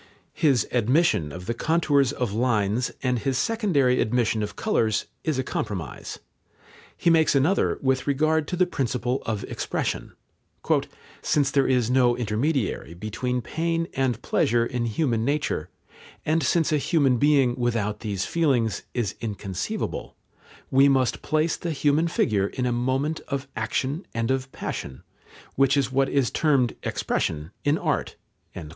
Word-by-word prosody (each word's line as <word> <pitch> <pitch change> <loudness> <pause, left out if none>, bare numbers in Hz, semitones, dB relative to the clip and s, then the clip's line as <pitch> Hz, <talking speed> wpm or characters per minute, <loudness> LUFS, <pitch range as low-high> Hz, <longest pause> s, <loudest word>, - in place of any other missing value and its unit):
His 135 -8 +2
admission 120 - +2
of 90 +4 -8
the 115 - -1
contours 145 -2 +2
of 125 -7 -2
lines 115 0 +1
and 125 -2 +1
his 135 +1 -1
secondary 160 - +2
admission 115 -1 +1
of 105 0 -4
colours 110 -1 +1 0.2
is 155 -4 0
a 130 - 0
compromise. 90 - -4 0.8
He 170 - +3
makes 160 -3 +4
another 145 +9 +2
with 130 0 +1
regard 155 +2 +2
to - - -2
the 180 +1 +3
principle 125 -4 -1
of 110 -3 -2
expression. - - -3 1.1
"Since 145 -2 +1
there 140 -1 +3
is 125 -2 +2
no 125 -2 +3
intermediary 115 - -1
between 120 +6 -3
pain 165 +4 -1
and 130 -4 0
pleasure 115 +1 +2
in 120 0 -2
human 115 -2 0
nature, 140 - -1 0.6
and 160 +1 +2
since 160 +4 +2
a 155 - +3
human 140 -5 +2
being 140 -3 +4
without 115 -4 -1
these 100 -4 -3
feelings 130 -10 +1
is 120 -6 -1
inconceivable, 100 -4 -4 0.6
we 135 +2 +6
must 130 -3 +1
place 155 +1 +1
the 170 - -4
human 150 +3 +2
figure 105 - +1
in 125 +4 -3
a 125 - +1
moment 130 +6 0
of 140 0 -3
action 130 - -2
and 115 +1 0
of 130 0 -2
passion, 65 -1 -6 0.5
which 135 +1 +3
is 135 -2 +1
what 135 +1 +2
is 135 -4 +1
termed 140 -6 +2
expression 75 +3 -2
in 145 +2 +2
art." - - -1
130 Hz, 145 wpm, -25 LUFS, 115-145 Hz, 1.1 s, we